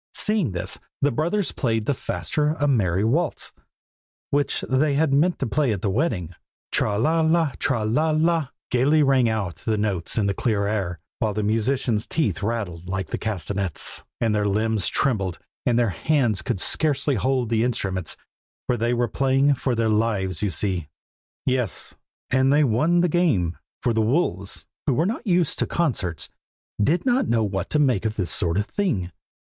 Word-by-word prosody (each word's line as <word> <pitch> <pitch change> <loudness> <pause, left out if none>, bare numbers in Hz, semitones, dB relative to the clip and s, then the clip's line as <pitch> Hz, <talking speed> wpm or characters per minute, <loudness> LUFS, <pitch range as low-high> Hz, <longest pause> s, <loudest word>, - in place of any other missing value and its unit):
Seeing 210 - +2
this, 90 - -3 0.2
the 145 - +4
brothers 170 - 0
played 115 -5 -1
the 145 - +1
faster 150 +3 -1
a 145 - +2
merry 100 -8 +2
waltz, 150 +8 0 0.8
which 145 0 +1
they 140 +2 +2
had 150 -1 +2
meant 170 +6 +3
to - - -2
play 140 +1 +1
at 100 -4 -3
the 100 - +1
wedding. 95 - -1 0.4
'Tra 105 -1 +1
la 160 +9 +2
la! 160 -1 +2
tra 120 -6 0
la 150 +9 +1
la!' 160 -1 +2 0.2
gaily 145 +5 +4
rang 130 -4 +3
out 100 -8 -2
the 110 -2 -1
notes 100 -4 -1
in 105 - +2
the 100 - +1
clear 100 0 0
air, 100 -5 -2 0.2
while 110 -5 0
the 105 - -1
musicians' 115 +1 0
teeth 105 - -1
rattled 100 -6 -3
like 95 0 -3
the - - -1
castanets, 100 -3 -1 0.2
and 115 -2 +1
their 105 -1 +1
limbs 110 0 +1
trembled, 100 - 0 0.3
and 120 -2 +3
their 120 -2 +3
hands 120 - +1
could - - -2
scarcely 145 +4 +1
hold 130 +1 0
the 115 -1 +2
instruments; 95 -8 -2 0.5
for 125 - 0
they 120 +2 +1
were 120 0 +1
playing 135 +3 +2
for 130 -1 -1
their 115 0 +1
lives, 105 -5 0
you 105 - +1
see! 90 -2 -1 0.6
yes, 125 -6 -1 0.4
and 130 +1 +3
they 150 +1 +5
won 150 +8 +3
the 180 - +3
game, 145 - +1 0.3
for 120 - +2
the 110 - +2
wolves, 110 - -1 0.2
who 135 - +3
were 160 - +2
not 230 +4 -3
used 175 -4 +2
to - - +1
concerts, 105 - -1 0.6
did 165 - +1
not 255 +1 +2
know 115 -1 +2
what 95 -2 -2
to - - +1
make 130 -9 +2
of 110 -1 -1
this 95 -5 -1
sort 85 0 +1
of 100 - +1
thing. 110 - -1
115 Hz, 180 wpm, -23 LUFS, 100-145 Hz, 0.8 s, they